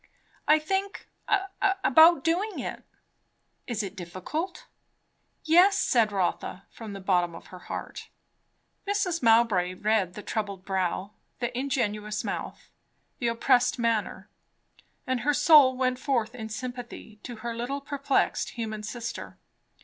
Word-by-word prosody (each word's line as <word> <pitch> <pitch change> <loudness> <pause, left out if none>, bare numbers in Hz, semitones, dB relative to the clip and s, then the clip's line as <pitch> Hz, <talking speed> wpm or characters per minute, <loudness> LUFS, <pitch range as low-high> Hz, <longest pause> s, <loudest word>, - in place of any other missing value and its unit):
"I 305 - +6
think 385 +6 -3 0.8
about 320 0 +6
doing 375 +6 0
it." - - -5 0.9
"Is 225 -3 -2
it 195 0 -6
difficult?" 185 - -5 0.8
"Yes," 360 +5 +5
said 230 - +2
Rotha 190 0 -2
from 220 -3 -9
the 195 - -7
bottom 180 -3 +1
of - - -12
her 185 - -8
heart. - - -6 0.8
Mrs. 395 -4 0
Mowbray 225 -6 +3
read 210 -3 0
the 210 - -8
troubled 200 -3 -4
brow, 190 +1 -1 0.3
the 240 0 -3
ingenuous 215 -6 -2
mouth, - - -6 0.5
the 240 - 0
oppressed 245 +2 +2
manner; 230 -3 -1 0.8
and 255 -1 -1
her 290 +5 +1
soul 280 -5 +6
went 255 -1 0
forth 245 -5 0
in 220 -3 -7
sympathy 240 -2 -7
to 245 - -7
her 235 -1 -3
little 245 +4 -3
perplexed 280 -1 0
human 220 -2 -4
sister. 230 +2 -6
235 Hz, 125 wpm, -27 LUFS, 210-280 Hz, 0.9 s, I